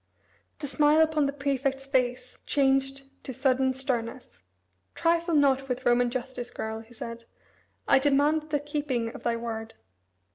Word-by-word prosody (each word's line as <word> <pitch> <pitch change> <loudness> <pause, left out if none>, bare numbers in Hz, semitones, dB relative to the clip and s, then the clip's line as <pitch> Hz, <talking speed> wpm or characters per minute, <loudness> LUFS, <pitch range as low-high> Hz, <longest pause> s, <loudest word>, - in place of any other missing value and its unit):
The 295 - -6
smile 295 +2 +4
upon 310 -2 +3
the - - -1
prefect's 275 -1 -1
face 250 -2 -1
changed 270 0 +1 0.2
to - - -5
sudden 265 -1 +2
sternness. 255 - -4 0.5
"Trifle 335 0 +1
not 270 -2 +3
with 250 0 -3
Roman 245 0 +4
justice, 250 -1 -5
girl," 220 -1 -5
he 225 +2 -15
said, 230 +1 -7 0.6
"I - - +6
demand 295 +3 +2
the 295 -1 +1
keeping 285 -6 -2
of - - -9
thy 235 - 0
word." 225 -1 -5
265 Hz, 145 wpm, -27 LUFS, 245-285 Hz, 0.6 s, I